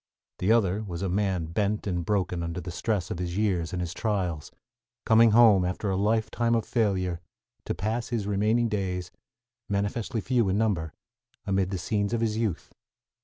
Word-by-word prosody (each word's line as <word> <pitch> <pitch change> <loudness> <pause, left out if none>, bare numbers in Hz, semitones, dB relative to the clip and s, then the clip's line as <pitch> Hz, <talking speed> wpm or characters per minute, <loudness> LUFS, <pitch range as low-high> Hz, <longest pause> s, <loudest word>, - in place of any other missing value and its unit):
The 95 +4 +2
other 105 -3 +3
was 95 -4 -5
a 95 - -1
man 95 -3 0
bent 100 +5 -1
and 90 -3 -1
broken 90 -2 -1
under 85 +1 -3
the 90 0 -6
stress 100 -1 -2
of 85 - -4
his 90 0 -3
years 95 -6 0
and 90 - -3
his 90 -1 -3
trials, 90 -8 -2 0.5
coming 115 +1 +6
home, 110 -4 +6
after 90 +3 -2
a - - 0
lifetime 110 +3 +1
of 115 - 0
failure, 95 -7 0 0.4
to - - -2
pass 110 +4 -2
his 115 -5 -2
remaining 105 +4 +2
days, 95 -4 -3 0.6
manifestly 100 +3 -1
few 120 -2 +1
in 95 - +1
number, 95 -8 0 0.5
amid 95 -2 +1
the 95 - -2
scenes 100 +5 -1
of 115 - 0
his 110 -2 0
youth. 110 -6 -2
100 Hz, 175 wpm, -27 LUFS, 90-110 Hz, 0.6 s, coming